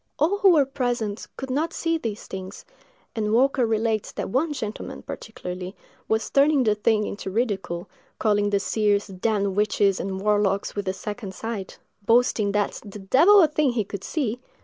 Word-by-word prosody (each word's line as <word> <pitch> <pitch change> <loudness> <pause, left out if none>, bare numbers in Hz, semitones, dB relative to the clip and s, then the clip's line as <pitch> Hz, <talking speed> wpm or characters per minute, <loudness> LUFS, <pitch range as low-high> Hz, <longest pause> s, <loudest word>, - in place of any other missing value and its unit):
All 360 +7 +2
who 395 - +6
were 305 -6 +5
present 245 -6 -2
could 265 -1 -5
not 320 +5 -1
see 330 -1 0
these 220 -6 -5
things, 190 0 -8 0.5
and 210 -2 -1
Walker 255 +1 +3
relates 220 -1 0
that - - -4
one 300 +7 +1
gentleman, 220 -7 -5
particularly, 180 -3 -7 0.3
was 220 0 0
turning 280 -1 +4
the 215 -3 +3
thing 210 0 +1
into 200 -1 -5
ridicule, 195 -5 -2 0.3
calling 205 -1 +2
the 200 -1 +2
seers 205 0 +1
"damned 200 +1 -1
witches 205 -2 +2
and 190 -1 -3
warlocks, 205 -1 +1
with 205 -1 -3
the 190 - -1
second 205 0 -6
sight!"—boasting 220 0 -1
that 205 -1 -1
"the 205 -1 -9
devil 325 - +6
a - - +5
thing 300 -3 +1
he 225 -3 0
could 200 -1 -7
see!" 250 -5 -2
215 Hz, 170 wpm, -24 LUFS, 200-255 Hz, 0.5 s, who